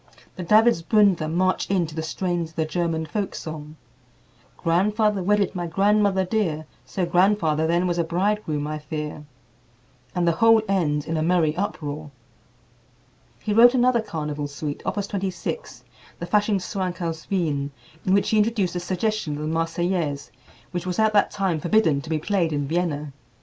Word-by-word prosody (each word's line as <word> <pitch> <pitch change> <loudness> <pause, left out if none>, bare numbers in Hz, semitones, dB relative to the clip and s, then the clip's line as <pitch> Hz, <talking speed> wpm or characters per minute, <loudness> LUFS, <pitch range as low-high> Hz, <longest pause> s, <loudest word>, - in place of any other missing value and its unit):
The - - -6
Davidsbündler 205 -4 +4
march 185 +2 +1
in 190 -3 +2
to 155 - -9
the 160 - -3
strains 175 +1 -2
of 160 - -23
the 160 - 0
German 165 -1 -1
folk 200 +5 -3
song, 155 -1 -7 0.8
"Grandfather 205 +4 +1
wedded 200 +1 +2
my 175 -2 -3
grandmother 195 +2 +2
dear, 175 -7 -1 0.2
So 185 -3 -1
grandfather 170 -3 +2
then 170 +2 +2
was 175 -1 0
a - - +3
bridegroom, 175 -3 -1
I 155 0 -4
fear," 150 0 -6 0.9
and 175 -1 +1
the - - +5
whole 225 +6 +5
ends 150 -7 0
in 165 - -2
a - - 0
merry 160 -2 +2
uproar. 155 -6 -4 1.3
He 210 - 0
wrote 240 +3 +7
another 245 -1 +3
carnival 150 -7 -4
suite, 145 0 -5
Opus 205 -1 -1
26, 190 -3 -4 0.3
the 170 - -5
"Faschingschwank 195 -2 0
aus 165 -2 -4
Wien," 150 -7 0 0.3
in 185 - +3
which 200 - +1
he 215 - +4
introduced 210 -5 +1
a - - 0
suggestion 185 -1 -2
of 150 - -5
the - - -2
"Marseillaise," 165 -3 -1 0.4
which 180 0 -4
was 180 - -2
at 220 -1 +3
that 205 - +4
time 190 -5 -1
forbidden 165 -4 +2
to 160 - -10
be 160 - +1
played 170 0 0
in 145 -2 -1
Vienna. 150 -3 -2
175 Hz, 165 wpm, -24 LUFS, 155-200 Hz, 1.3 s, wrote